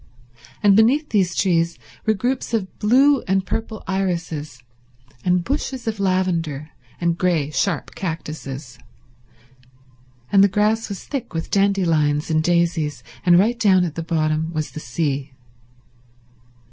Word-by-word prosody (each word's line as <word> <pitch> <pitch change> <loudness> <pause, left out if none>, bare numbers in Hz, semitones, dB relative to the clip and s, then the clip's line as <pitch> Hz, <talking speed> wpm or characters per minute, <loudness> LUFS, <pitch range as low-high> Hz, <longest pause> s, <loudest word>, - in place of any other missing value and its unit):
And 200 -1 +6
beneath 260 +8 +4
these 190 -5 +1
trees 170 -3 +1 0.3
were 220 - +4
groups 245 +2 -1
of 190 -4 -4
blue 265 +6 +4
and 190 0 +1
purple 220 0 -4
irises, 175 -7 -2 0.7
and 180 -1 +2
bushes 265 - -3
of 220 -2 -3
lavender, 170 -6 -1 0.3
and 170 -1 0
grey, 165 -5 +1
sharp 150 +8 -1
cactuses, 155 -6 -6 1.5
and 195 -1 +6
the - - +7
grass 210 +3 +1
was 200 - -6
thick 250 - -5
with 165 - -4
dandelions 165 -7 +2
and 155 0 +3
daisies, 165 -6 0 0.2
and 175 -1 +6
right 230 +6 +2
down 190 -4 +4
at 165 - -4
the 165 - -4
bottom 160 -1 0
was 155 -2 -3
the - - -7
sea. 140 0 -2
180 Hz, 135 wpm, -21 LUFS, 155-205 Hz, 1.5 s, the